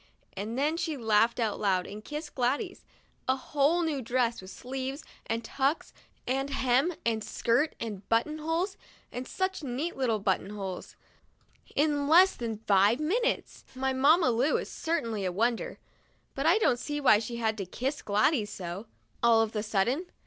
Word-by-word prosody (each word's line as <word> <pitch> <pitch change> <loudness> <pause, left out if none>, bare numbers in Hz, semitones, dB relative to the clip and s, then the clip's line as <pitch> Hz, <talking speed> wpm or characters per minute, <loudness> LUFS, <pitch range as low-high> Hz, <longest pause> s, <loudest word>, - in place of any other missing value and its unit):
And 210 +5 -4
then 300 +4 +1
she 320 -3 -2
laughed 225 0 +2
out 220 -3 0
loud 190 -3 +1
and 210 +1 -8
kissed 300 +3 -6
Gladys. 280 - -1 0.4
A 260 - +3
whole 295 +5 +1
new 300 -4 -1
dress, 240 -1 0
with 185 - -11
sleeves, 265 +5 -5 0.2
and 230 +1 -2
tucks, 275 +6 -1 0.3
and 270 +2 -1
hem, 275 +5 +2
and 225 -2 0
skirt, 245 +9 +1
and 210 -4 -6
buttonholes 310 - 0 0.2
— - - -30
and 250 +1 -5
such 375 -1 -2
neat 280 +5 -3
little 245 -5 +1
buttonholes 195 -1 -3 0.4
— - - -38 0.3
in 290 -1 +2
less 360 +5 +6
than 230 -3 -4
five 205 +5 +4
minutes! 435 +11 -1
My 265 +1 0
Mamma 280 +2 +4
Lu 245 +6 +2
is - - -5
certainly 235 - -2
a 185 - 0
wonder; 230 +5 -1 0.6
but 275 +3 -1
I 345 +5 +6
don't 250 - +2
see 295 +3 -3
why 250 -7 +6
she 230 +2 -5
had 225 -2 0
to 195 - -2
kiss 265 - -3
Gladys 210 +2 +2
so, 185 +4 -6 0.3
all 230 -1 +5
of 220 0 -5
a 210 - 0
sudden. 225 - 0
250 Hz, 170 wpm, -29 LUFS, 220-300 Hz, 0.6 s, less